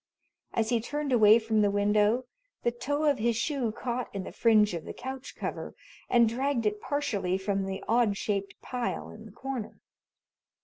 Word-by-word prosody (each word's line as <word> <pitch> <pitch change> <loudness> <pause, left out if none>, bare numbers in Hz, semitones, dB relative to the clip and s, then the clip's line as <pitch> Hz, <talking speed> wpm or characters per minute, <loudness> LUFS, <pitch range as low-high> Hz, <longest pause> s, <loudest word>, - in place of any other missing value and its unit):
As 220 -1 +1
he 235 -2 +2
turned 290 +3 -3
away 215 -2 +7
from 220 -1 +1
the 205 - +4
window 210 +4 +2 0.4
the 240 - +2
toe 285 +5 -2
of 290 -4 +3
his 235 +1 +1
shoe 255 -3 0
caught 245 +2 -3
in 195 - -2
the - - -7
fringe 215 -4 +4
of 165 -2 -4
the - - -7
couch 265 +1 -7
cover - - -5 0.3
and 235 -2 +5
dragged 250 +1 0
it 210 0 0
partially 205 -11 -1
from 195 0 -1
the 190 0 -4
odd 225 -3 +3
shaped 195 -1 -2
pile 245 -1 -3
in 220 - -12
the - - -13
corner. 260 0 -6
225 Hz, 180 wpm, -29 LUFS, 210-250 Hz, 0.4 s, away